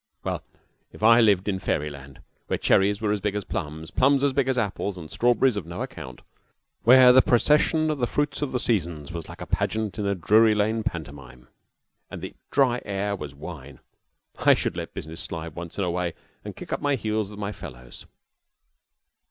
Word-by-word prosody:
Well, - - -3 0.5
if - - -11
I 115 +2 +7
lived 100 -4 +3
in 95 -2 -1
fairy 75 -4 -1
land, 70 -1 -12 0.3
where - - 0
cherries 100 +2 +2
were 105 -2 0
as 105 -1 -1
big 105 0 -1
as 105 - -2
plums, 80 -3 -5
plums 140 +1 +3
as 140 -2 +2
big 135 -1 +1
as 130 -1 0
apples, 100 -3 -2
and 80 -3 -9
strawberries 120 +1 +2
of 90 -5 -5
no 85 +1 -4
account, 65 -1 -9 0.6
where 125 +1 +8
the 130 - +8
procession 150 +5 +3
of 150 - -3
the 120 - +1
fruits 145 +1 -1
of 145 - -2
the 125 - -1
seasons 85 - -1
was 85 -1 -6
like - - -10
a - - -4
pageant 110 -1 -2
in 100 - -1
a 100 - +1
Drury 110 +5 +4
Lane 110 +2 +1
pantomime 70 - -7 0.6
and - - -7
the - - -6 0.2
dry 130 -4 +2
air 100 0 -2
was 75 -6 -8
wine, 70 -3 -9 0.6
I - - +5
should - - -2
let - - -6
business 80 +2 -7
slide 80 -1 -6
once 85 0 -8
in 100 - 0
a 90 - 0
way 90 -1 -2 0.3
and - - -7
kick - - -7
up - - -2
my 145 -1 +1
heels 110 -3 -2
with 105 - -11
my 105 0 -3
fellows. 60 -11 -11
100 Hz, 200 wpm, -25 LUFS, 80-120 Hz, 0.6 s, where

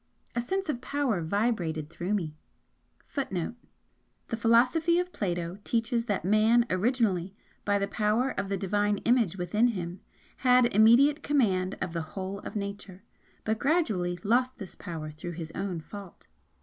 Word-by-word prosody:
A 240 - +1
sense 380 +10 -2
of 265 -6 -2
power 260 -8 0
vibrated 170 -4 -1
through 180 +6 -2
me 160 -6 -3 0.7
[Footnote: 190 - -3 0.8
The 230 - -1
philosophy 250 +10 +3
of 360 0 -1
Plato 175 -1 -3
teaches 230 +1 0
that 205 -6 -1
Man 220 +4 +4
originally 195 -3 +1 0.3
by 205 0 +3
the 200 0 0
power 215 +6 +1
of 195 0 -3
the 200 - 0
Divine 205 +1 +1
Image 230 -7 +3
within 200 +7 +2
him 180 -5 -4 0.4
could 250 -1 +5 0.5
control 190 - -1
all - - -6
Nature, 200 -2 -5 0.4
but 220 0 -1
gradually 215 - +1
lost 250 +4 +2
this 195 -5 -8
power 155 -3 -6
through 175 +3 -7
his 160 -1 -6
own 185 -4 -3
fault. 195 +3 -11
205 Hz, 135 wpm, -28 LUFS, 180-240 Hz, 0.8 s, could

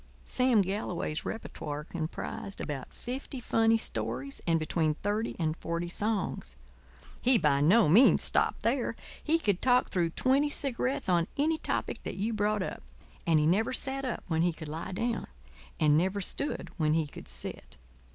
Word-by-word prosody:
Sam 250 -5 +3
Galloway's 180 -5 -3
repertoire 150 -9 -5
comprised 170 +4 -5
about 140 -4 -5
fifty 260 +2 -6
funny 225 -1 +3
stories 125 - -3
and 165 -1 +4
between 155 -1 0
thirty 210 +6 -2
and 155 -2 0
forty 170 +1 -3
songs. 195 - -2 0.7
He 250 0 +5
by 145 -5 +2
no 195 +8 +5
means 210 - +6
stopped - - +2
there. 235 -1 0 0.3
He 320 +2 +3
could 205 - 0
talk 250 0 +4
through 175 -3 +1
twenty 270 - +2
cigarettes 265 -3 -1
on 175 -2 +2
any 315 +3 +1
topic - - -2
that - - -5
you 215 +4 -1
brought 210 -1 +1
up. - - -5 0.5
And 160 -2 +5
he 150 - +2
never 200 +10 +2
sat 270 +1 -1
up 255 -3 -3
when 160 -2 +1
he 175 +1 +3
could 160 -1 -8
lie 160 +4 -5
down; 230 +4 -2 0.5
and 150 0 +5
never 190 +3 0
stood 280 +9 -1
when 155 -1 +2
he 160 -1 +1
could 145 - -11
sit. - - -6
190 Hz, 165 wpm, -30 LUFS, 160-235 Hz, 0.7 s, means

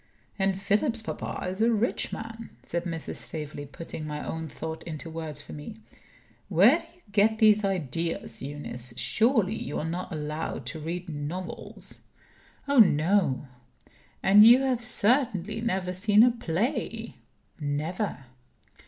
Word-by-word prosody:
"And 195 0 +1
Philip's 215 +4 +1
papa - - -4
is 190 +3 -3
a 230 +1 +4
rich 225 +1 +1
man," 225 0 -7
says 170 +1 -3
Mrs. 165 -2 -4
Staveley, 150 -2 -6
putting 155 +2 -7
my 150 0 -4
own 160 0 -4
thought 160 +1 -6
into 160 0 -7
words 155 -3 -6
for - - -10
me. 150 +9 -8 0.7
"Where - - +6
do - - -14
you 355 - -26
get 215 +2 +4
these 215 -1 +5
ideas, 170 -4 -2
Eunice? 125 -4 -5
Surely, 220 - +2
you 150 -9 -4
are - - -2
not 175 +3 -4
allowed 150 -4 -4
to 145 +6 -5
read 170 +4 -4
novels?" 160 +4 -5 0.7
"Oh 280 -2 +4
no!" 175 - +4 0.8
"And 205 +2 +8
you 240 +4 +9
have 255 -3 0
certainly 220 -4 +1
never 190 -6 -1
seen 210 +3 +5
a 245 - +6
play?" 230 - -2 0.4
"Never." 150 +2 -2
185 Hz, 140 wpm, -27 LUFS, 155-220 Hz, 0.8 s, you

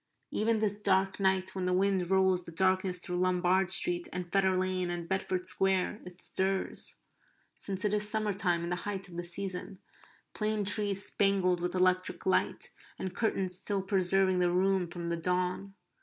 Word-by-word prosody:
Even 225 +1 +1
this 210 -1 -1
dark 190 -1 +2
night 190 -1 +1
when 185 -1 -3
the 180 - +1
wind 190 -2 +1
rolls 190 -1 +3
the 170 - -10
darkness 185 +1 +1
through 180 0 -3
Lombard 185 +1 +2
Street 175 -2 +1
and 180 -1 -5
Fetter 190 -1 +3
Lane 185 -1 0
and 175 -1 -4
Bedford 185 -1 -1
Square 190 +2 0
it 180 0 -11
stirs 190 0 -1 0.6
(since 195 0 -4
it 210 - +1
is 210 0 +1
summer 215 -1 0
time 175 -3 0
and 170 - -3
the 175 - 0
height 195 -2 -4
of 170 - -11
the 175 - -3
season), 185 +2 -5 0.6
plane 215 -1 -1
trees 205 -1 0
spangled 190 -3 +1
with 180 +1 -2
electric 185 0 +1
light, 190 - +1 0.3
and 185 -1 -5
curtains 190 -4 -1
still 200 -2 -1
preserving 190 -1 +3
the 180 -1 +3
room 185 0 +2
from 170 0 -6
the 170 0 -1
dawn. 180 +3 -1
185 Hz, 175 wpm, -31 LUFS, 180-195 Hz, 0.6 s, rolls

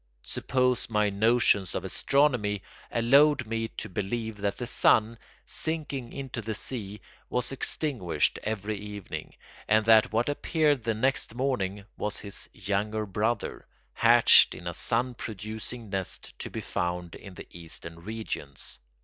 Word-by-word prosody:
Suppose 125 -2 +1
my 105 -2 +2
notions 105 -3 +3
of 95 - -2
astronomy 105 -2 +1 0.3
allowed 135 +4 +5
me 115 +1 -2
to 110 - -7
believe 110 +3 -3
that 100 -1 -2
the 125 - -3
sun, 115 -1 +3 0.3
sinking 145 -6 -3
into 135 -4 -5
the 110 0 -4
sea, 105 -3 -5 0.3
was 125 +1 0
extinguished 125 - +1
every 105 0 -3
evening, 105 -1 -7 0.3
and 110 0 +4
that 110 -1 +6
what 115 +2 +1
appeared 145 -2 +1
the 115 -1 +1
next 125 0 0
morning 105 -7 -1
was 105 - -2
his 100 -1 -4
younger 105 +2 -1
brother, 105 +3 -2 0.3
hatched - - +6
in - - -10
a 85 - -3
sun 120 +8 +1
producing 110 0 -6
nest 95 -2 -4
to - - -5
be - - -5
found 90 -1 -3
in 95 -3 -11
the - - -9
Eastern 85 0 -7
regions. 90 - -5
110 Hz, 140 wpm, -28 LUFS, 100-125 Hz, 0.3 s, that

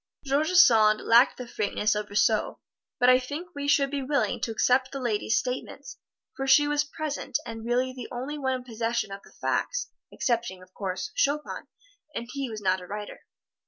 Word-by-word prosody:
George 285 +4 +1
Sand 220 -11 +6
lacked 235 +3 +5
the 250 - -6
frankness 210 -1 0
of 210 0 -3
Rousseau; 210 +1 +1 0.4
but 245 - +4
I 255 0 +7
think 290 +8 -6
we 285 0 -4
should 280 -1 +3
be 285 -1 -2
willing 280 0 0
to - - -1
accept 255 +4 +2
the 275 - -5
lady's 225 -3 0
statements, 250 - -5 0.4
for 270 - -3
she 290 +2 +6
was 295 0 +2
present 295 -4 -3
and 225 -1 -7
really 250 +2 0
the 250 -2 -7
only 265 +5 -5
one 265 -2 0
in 255 - -6
possession 230 -3 -2
of 195 0 -7
the - - -19
facts, - - -1 0.2
excepting, 230 -7 -2
of 185 0 -20
course, 190 -2 -4
Chopin, 295 +2 -1 0.5
and 235 - -4
he 275 -2 -3
was 215 -2 -6
not 185 -1 +1
a 180 - -10
writer. 210 +1 -7
250 Hz, 190 wpm, -27 LUFS, 215-275 Hz, 0.5 s, I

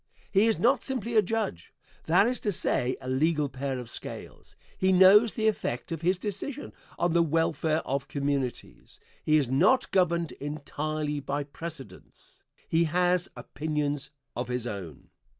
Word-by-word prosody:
He 205 +3 +4
is 225 - +2
not 250 +4 +3
simply 235 -3 -3
a 215 - +7
judge 210 - -3 0.3
that 180 +5 +4
is 250 +2 0
to 210 - -1
say, 130 -7 0
a 130 - -8
legal 150 +3 +1
pair 135 0 -3
of 125 -2 -7
scales - - -7 0.2
he 190 0 +2
knows 195 +4 +6
the 220 -2 +1
effect 145 - -2
of 165 -2 -3
his 180 +2 +2
decision 215 +9 -4 0.2
on 175 -1 +1
the 170 - +4
welfare 160 0 +1
of 135 +1 -2
communities 140 -3 -3 0.2
he 155 0 +4
is 145 -4 +1
not 140 - +3
governed 170 -3 +2
entirely 150 +1 -4
by 140 +1 -3
precedents 150 0 -10 0.2
he 165 +1 +2
has 180 +2 +1
opinions 145 +2 -3 0.3
of 120 0 -3
his 125 -1 -3
own. 95 - -7
155 Hz, 155 wpm, -28 LUFS, 140-190 Hz, 0.3 s, a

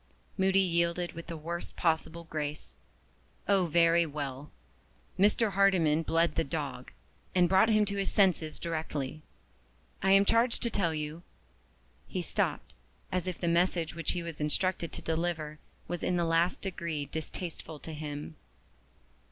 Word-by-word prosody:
'" - - -37
Moody 190 0 +3
yielded 170 -1 +1
with 170 0 -8
the 165 -1 -5
worst 170 +3 -5
possible 165 0 0
grace. 150 -2 -5 0.7
"Oh, 195 -3 +3
very 170 +1 +4
well! 140 -1 -5 0.7
Mr. 210 +2 +4
Hardyman 185 -6 +4
bled 165 0 +2
the - - +1
dog, 135 - -4 0.4
and 180 -1 +5
brought 190 +5 +5
him 215 -1 +4
to 200 0 -3
his 195 - 0
senses 180 -6 +2
directly. 155 -3 -3 0.8
I 190 - +2
am 195 0 +6
charged 230 +3 +3
to 235 - 0
tell 170 -6 +1
you 150 +2 -4 0.5
" - - -35
He - - -1
stopped, - - -1 0.4
as 185 0 -1
if 180 - -3
the 175 - -1
message 170 -1 +2
which 165 0 -2
he 175 -1 -3
was 165 -3 -6
instructed 170 +3 0
to - - -6
deliver 160 -2 -2 0.3
was 175 -1 -3
in 180 - 0
the 170 -1 +1
last 165 +2 +2
degree 170 -6 -3
distasteful 160 +1 -6
to 160 +2 -8
him. 150 0 -6
170 Hz, 155 wpm, -30 LUFS, 155-185 Hz, 0.8 s, am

